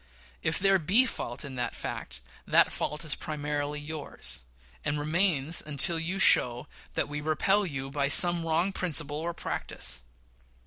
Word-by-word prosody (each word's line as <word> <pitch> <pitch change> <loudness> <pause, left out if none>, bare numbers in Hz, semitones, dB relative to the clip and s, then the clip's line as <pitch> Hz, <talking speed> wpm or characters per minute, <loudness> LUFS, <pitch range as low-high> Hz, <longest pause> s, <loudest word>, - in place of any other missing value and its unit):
And - - -2
if 165 - -3
there 195 0 +3
be 200 +11 +5
fault 135 - -4
in 140 - -8
that 120 - -3
fact, - - -7 0.3
that - - +4
fault 150 +2 -4
is 150 - +3
primarily 150 -1 -4
yours, 150 - -5 0.4
and 145 0 -2
remains 160 -1 +2
so - - +1
until 155 +3 0
you 175 +4 -3
show 125 -8 +4 0.3
that - - 0
we 150 0 -5
repel 190 +7 +1
you 135 -3 -6
by, 140 0 0
some 175 +3 +7
wrong 165 +4 0
principle 150 -5 -4
or 170 +2 -4
practice. 60 +1 -3
150 Hz, 165 wpm, -28 LUFS, 145-170 Hz, 0.4 s, some